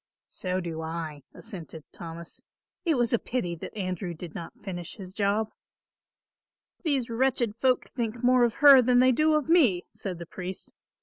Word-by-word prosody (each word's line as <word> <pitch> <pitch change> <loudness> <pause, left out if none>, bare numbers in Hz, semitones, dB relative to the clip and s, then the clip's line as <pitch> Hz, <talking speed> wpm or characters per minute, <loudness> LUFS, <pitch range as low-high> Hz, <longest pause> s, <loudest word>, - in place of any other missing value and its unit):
"So 185 0 -3
do 165 -3 -4
I," 160 -2 -5
assented 165 -5 -9
Thomas. 170 0 -8 0.4
"It 325 -3 +3
was 240 -2 +1
a 235 - +4
pity 205 -9 -2
that 190 - -8
Andrew 185 -2 -3
did 165 0 -9
not 170 - -8
finish 175 -4 -6
his 190 -3 -8
job." 210 +2 0 1.3
"These 275 -7 0
wretched 240 -2 +1
folk 255 +1 +2
think 235 -1 -3
more 250 0 +5
of 235 -1 +2
her 275 -2 +11
than 250 0 +3
they 255 +1 +6
do 310 +4 +3
of 300 -2 0
me," 270 - +4
said 185 -4 -5
the 170 - -7
priest. 185 +2 -7
205 Hz, 170 wpm, -27 LUFS, 175-250 Hz, 1.3 s, her